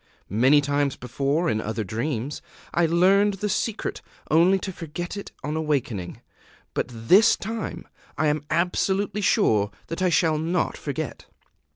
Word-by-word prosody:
Many 130 +8 +5
times 145 -1 0
before, 140 +7 -1
in 110 -4 0
other 110 0 -3
dreams, 120 +6 -3 0.3
I 170 -1 +3
learned 195 +5 +4
the 210 +2 -2
secret 215 +2 -2 0.3
only 175 +5 +5
to 190 0 -5
forget 170 +2 -6
it 200 - -7
on 150 +1 -2
awakening; 135 - -2 0.5
but - - -1
this 125 - +5
time 225 +2 -5 0.3
I 155 - +1
am 150 0 +1
absolutely 190 +3 0
sure 105 - +3 0.2
that 165 - -4
I 185 - +3
shall 160 -1 +2
not 165 +2 0
forget." 150 -1 -5
155 Hz, 145 wpm, -24 LUFS, 135-185 Hz, 0.5 s, Many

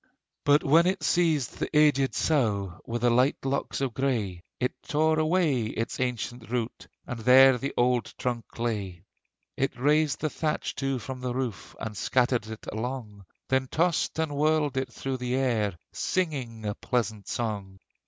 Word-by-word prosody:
But 145 +1 +5
when 165 +5 +5
it 190 -3 0
seized 155 -7 +1
the - - -1
aged 140 -3 +4
saugh, 100 - 0
With 120 0 -3
the 120 - +5
light 125 +4 +3
locks 135 0 -1
of 130 -3 -1
gray, 110 -9 -1 0.2
It 125 - 0
tore 155 0 +1
away 155 -7 +2
its 115 +1 -3
ancient 120 -2 -3
root, 120 -1 -3 0.2
And 125 - -5
there 130 +3 +7
the 140 - -2
old 120 -2 +2
trunk 120 -2 -4
lay! 100 -7 -3 0.5
It 135 - -1
raised 150 +2 +3
the 155 - 0
thatch 155 -1 -2
too 135 -1 -1
from 130 +2 -7
the 125 -1 -2
roof, 125 -5 -4
And 110 -1 -5
scattered 120 +1 +1
it 110 0 -8
along; 110 -4 -5 0.2
Then 130 0 +1
tossed 170 +4 +1
and 160 -2 -1
whirled 150 -1 +2
it 130 0 -2
through 135 -1 -3
the 125 0 -2
air, 110 -8 0 0.2
Singing 130 - -2
a 105 - -1
pleasant 110 -3 -2
song. 100 -5 -3
125 Hz, 165 wpm, -27 LUFS, 115-145 Hz, 0.5 s, there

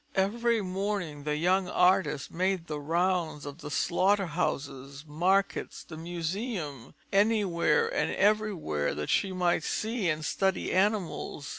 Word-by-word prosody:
Every 225 +3 +1
morning, 185 -6 -3
the 150 0 0
young 180 +4 +2
artist 180 -7 +2
made 185 0 0
the 150 -3 -4
rounds 165 -1 0
of 145 +3 -8
slaughter 195 +5 +2
houses, 140 -4 -3
markets, 180 +6 0
the 160 - -10
Museum, 170 - -4 0.2
anywhere 205 - +3
and - - 0
everywhere 195 - +1
that 75 - -3
she 195 - +2
might 175 -3 +1
see 220 -1 -1
and 155 -1 -1
study 190 +2 0
animals. 190 -7 0
180 Hz, 125 wpm, -29 LUFS, 155-195 Hz, 0.2 s, anywhere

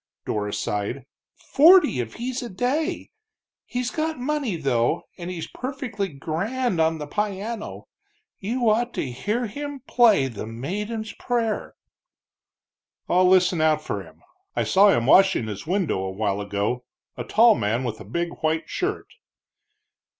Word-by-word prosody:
Dora 105 -1 -2
sighed, 105 +7 -3 0.3
"forty 320 - +5
if 115 -2 -4
he's 250 +2 -3
a 240 - -6
day. 290 - -2 0.6
He's 250 0 -2
got 315 0 -2
money, 265 -5 -1
though, 125 -7 +1
and 175 0 -7
he's 175 -3 -4
perfec'ly 240 - -5
grand 195 - -1
on 160 0 +2
the 150 - -5
pieanno. 210 +6 -4 0.6
You 235 +4 -1
ought 235 +3 +2
to 130 - -2
hear 210 - -2
him 285 +5 -6
play 230 - +4
The 110 -3 -6
Maiden's 210 - -4
Prayer!" 230 -3 -2 1.3
"I'll 180 +1 +4
listen 180 -2 +4
out 155 -1 +3
for 100 - -3
him. - - -16 0.3
I - - +1
saw 200 +2 +5
him 120 -11 +2
washing 190 -3 +5
his 105 +5 -6
window 185 - 0
a 95 0 -3
while 100 +1 -1
ago 105 +5 -2 0.3
a 120 - -4
tall 225 - +5
man 115 - -1
with 115 -3 -4
a - - -8
big 170 - -2
white 160 0 0
shirt." 395 +3 -2
190 Hz, 145 wpm, -24 LUFS, -, 1.3 s, forty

